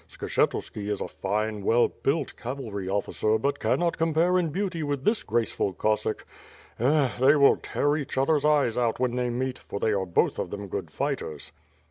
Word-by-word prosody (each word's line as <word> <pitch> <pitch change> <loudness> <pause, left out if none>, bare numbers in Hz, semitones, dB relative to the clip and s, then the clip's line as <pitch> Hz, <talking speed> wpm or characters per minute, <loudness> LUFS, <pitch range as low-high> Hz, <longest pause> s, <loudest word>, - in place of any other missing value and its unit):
Skshetuski 105 -1 -1
is 105 - -1
a - - -3
fine, 105 +2 -2
well 120 +4 +4
built 140 0 -2
cavalry 115 -7 -5
ofiicer 105 +2 0
but 140 +4 -1
canot 170 -1 0
compare 165 +3 +3
in 170 -3 0
beauty 185 0 -2
with 145 -3 -2
this 215 +5 +2
graceful 115 -4 -1
Cossack. 105 +4 -1 0.5
Eh! 135 +1 +3
they 135 +4 +6
will 140 -2 +5
tear 145 +1 0
each 145 -3 -4
other's 145 +2 +2
eyes 145 -6 +3
out 120 -1 0
when 125 -1 +1
they 125 0 0
meet, 130 +2 -2
for 100 - -6
they 110 - +1
are 95 -2 -1
both 85 - +1
of - - -2
them 100 0 -6
good - - -4
fighters." 75 -2 -4
125 Hz, 180 wpm, -26 LUFS, 110-150 Hz, 0.5 s, they